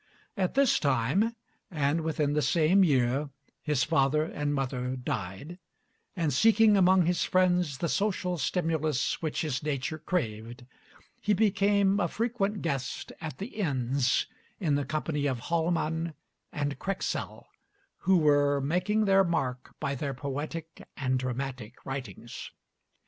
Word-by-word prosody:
At 190 0 -1
this 275 -2 +4
time, 145 - +1 0.3
and 150 -1 0
within 150 -2 0
the 150 - +2
same 165 +7 +4
year, 135 -2 +2 0.3
his 150 -4 +1
father 150 -1 +2
and 145 -2 -2
mother 130 -2 -2
died, 125 - -5 0.6
and 165 -5 0
seeking 220 - +5
among 185 -2 +5
his 175 +1 +1
friends 180 -6 +2
the 170 - -1
social 185 -3 -1
stimulus 155 -3 0
which 155 -2 -2
his 150 -5 -2
nature 150 +1 -2
craved, 120 -6 -3 0.6
he 210 0 +2
became 200 -1 +3
a 175 - +2
frequent 215 -1 -1
guest 140 -6 -3
at 160 -2 -5
the 205 +3 -7
inns 135 - +1 0.3
in 165 -8 +1
the 140 0 +1
company 150 0 -1
of 130 -3 -1
Hallman 165 +2 -1 0.4
and 145 -2 -3
Krexel, 195 +4 -3 0.5
who 190 0 +3
were 145 -2 +3
making 180 +9 +1
their 195 -1 +5
mark 130 -8 -2
by 140 -2 -1
their 140 0 -3
poetic 145 +4 -5 0.2
and 130 -2 0
dramatic 125 -2 -4
writings. 125 -4 -6
155 Hz, 135 wpm, -29 LUFS, 135-180 Hz, 0.6 s, seeking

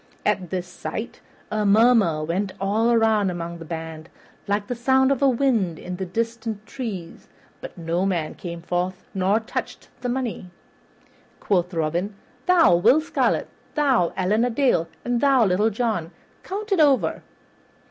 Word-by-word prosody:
At 180 -3 0
this 180 -1 -3
sight 220 +5 -6 0.3
a 215 0 0
murmur 205 -6 +4
went 185 +5 -2
all 215 +4 +1
around 220 -4 +3
among 170 -1 -5
the 165 - -8
band, 160 0 -7 0.4
like 205 +1 0
the 245 - -3
sound 265 +2 +3
of 275 - +1
the 275 - +4
wind 230 - +1
in 180 - -6
distant 220 +3 -3
trees; 215 -11 -7 0.3
but - - -9
no 170 +3 -1
man 170 -5 -1
came 170 -1 -7
forward 180 +1 -1 0.2
nor 195 +3 +2
touched 225 - -6
the 250 - -2
money. 240 -7 -3 0.9
Quoth 180 -3 0
Robin, 170 +4 -1 0.3
"Thou, 340 - +6
Will 255 - +5
Scarlet, 315 - 0 0.3
thou, 265 - +3
Allan 205 +5 +2
a 245 - +2
Dale, 240 - +2 0.2
and 240 -1 0
thou, 270 -5 +5
Little 200 +3 +2
John, 220 -7 -1 0.3
count 415 +3 -6
it 390 - +3
over." 285 -4 +3
205 Hz, 150 wpm, -23 LUFS, 175-245 Hz, 0.9 s, Thou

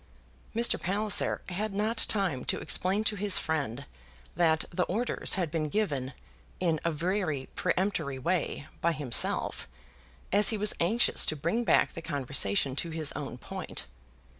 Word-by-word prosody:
Mr. 235 +1 +3
Palliser 205 +3 +1
had 200 +3 -3
not 215 +3 0
time 185 -11 0
to - - 0
explain 195 +4 0
to 220 -1 +1
his 200 -1 +3
friend 140 -4 -2 0.5
that 160 -3 +2
the 175 - -1
orders 230 +6 +1
had 175 -5 -1
been 155 -2 -1
given, 140 -10 -1 0.5
in 165 -4 +1
a 170 - +1
very 160 -3 -2
peremptory 180 -7 -1
way, 145 +1 -1 0.2
by 170 0 +2
himself, 140 -5 -1 0.6
as 205 +2 +5
he 220 - +3
was 210 0 +3
anxious 215 +8 +4
to 155 - +1
bring 225 +11 -1
back - - +3
the 165 - -7
conversation 135 -4 0
to 170 - -1
his 160 -2 -1
own 135 -4 -6
point. - - -6
170 Hz, 150 wpm, -29 LUFS, 145-205 Hz, 0.6 s, as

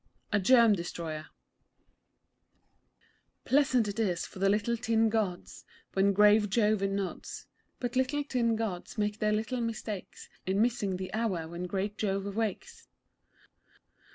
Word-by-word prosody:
A 205 - +4
GERM 230 +2 +6
DESTROYER 165 -4 -4 2.2
Pleasant 260 -5 +3
it 205 +2 -4
is 185 -6 0
for - - -11
the 195 +1 +3
Little 210 +3 +1
Tin 225 -1 +2
Gods 210 -5 -2 0.3
When 195 +1 +3
great 210 +1 +5
Jove 210 -1 +2
nods; 195 -1 -3 0.3
But 245 0 -3
Little 260 +3 +1
Tin 240 -5 +1
Gods 220 -1 -4
make 210 0 -1
their 210 0 +1
little 220 +4 -1
mistakes 220 -3 -5 0.2
In 190 +1 +1
missing 215 -5 +1
the 185 0 -6
hour 205 -8 -1
when 170 +2 -5
great 200 +3 -3
Jove 200 -1 -1
wakes. 220 -4 -3
210 Hz, 130 wpm, -30 LUFS, 195-230 Hz, 2.2 s, GERM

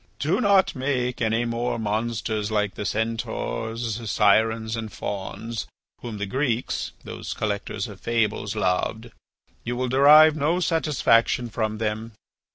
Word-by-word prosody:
Do 160 +8 0
not 200 -5 +4
make 130 -2 -1
any 115 +1 +1
more 120 +1 -1
monsters 110 -1 -2
like 105 -2 0
the 105 - -4
Centaurs, 115 +1 -3
Sirens, 110 +2 +2
and 110 -2 -5
Fauns, 110 +3 -5 0.3
whom 115 -3 -6
the 105 - -2
Greeks, 125 +2 -1
those - - -6
collectors 100 -1 -3
of 100 -3 -11
fables, 110 -2 0
loved. 110 +4 -1 0.5
You 120 - -3
will 125 0 -1
derive 150 +4 +7
no 155 +4 +1
satisfaction 130 -8 +2
from 110 -1 -2
them. 110 +1 -3
115 Hz, 130 wpm, -24 LUFS, 110-125 Hz, 0.5 s, derive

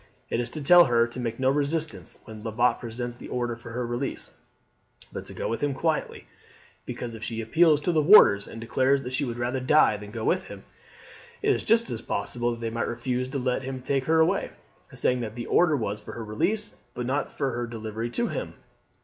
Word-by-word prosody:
It - - +1
is 120 0 -2
to 150 - -4
tell 175 +4 +8
her 120 -3 +3
to 120 +2 -8
make 115 -1 -3
no 130 0 +3
resistance 150 +3 -2
when 110 -2 -10
Lebat 120 +2 +1
presents 120 +1 -5
the - - -10
order 120 -1 -2
for 115 0 -11
her 125 0 -2
release, 120 +3 -4 0.8
but - - -6
to - - -10
go - - -3
with 115 - -3
him 145 -2 0
quietly; 160 +2 -1 0.6
because 120 -1 -5
if 110 0 -8
she 115 -1 -3
appeals 155 +7 +4
to 175 - +1
the 160 -2 +3
warders 145 - +7
and 115 - -9
declares 130 +4 +1
that 125 - -6
she 140 +2 0
would 120 -2 -4
rather 120 +2 -1
die 130 -4 +4
than 105 0 -10
go - - -6
with - - +1
him, - - -10 0.8
it - - +4
is - - -2
just 225 - +1
possible 120 +4 -1
that 120 -1 -4
they 115 -1 -2
might 115 +1 -2
refuse 125 +2 -2
to 140 - -3
let 125 0 0
him 130 0 -5
take 135 +1 -1
her 160 0 +3
away, 160 - +2 0.4
saying 125 0 0
that 115 -2 -5
the 120 -1 -5
order 160 -4 +3
was 105 -3 -3
for - - -9
her 115 - -6
release, 205 - -2
but 125 -1 -3
not 140 +4 -1
for 135 -2 -2
her 120 0 -3
delivery 110 0 -5
to 235 - -1
him. - - -5
125 Hz, 220 wpm, -26 LUFS, 115-140 Hz, 0.8 s, tell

